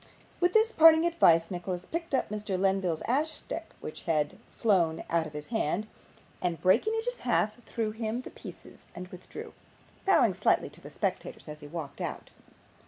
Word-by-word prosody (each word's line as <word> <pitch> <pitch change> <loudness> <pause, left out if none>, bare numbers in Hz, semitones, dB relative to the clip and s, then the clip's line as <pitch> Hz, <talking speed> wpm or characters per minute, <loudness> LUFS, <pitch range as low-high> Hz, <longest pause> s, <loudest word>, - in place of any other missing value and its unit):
With 355 0 +3
this 445 +1 +4
parting 320 -2 +7
advice 170 - +4
Nicholas 180 0 -4
picked 335 -3 -2
up - - 0
Mr. 210 -2 -3
Lenville's 190 -4 +1
ash 290 +6 +1
stick 325 +1 -6
which 155 - -7
had 150 -2 +1
flown 175 -7 +1
out 165 -1 +2
of 155 - -12
his 150 0 -7
hand, 215 -3 0 0.6
and 175 -2 -1
breaking 225 - +3
it 450 +1 -2
in - - -3
half, 230 -1 0
threw 225 -2 -2
him 220 +2 -3
the - - -10
pieces - - -12
and 180 +1 -7
withdrew, 180 0 -9 0.5
bowing 390 - +5
slightly - - +1
to - - -15
the - - -10
spectators - - -3
as 150 0 -8
he 145 - -10
walked 150 -2 -6
out. - - -5
205 Hz, 175 wpm, -29 LUFS, -, 0.6 s, parting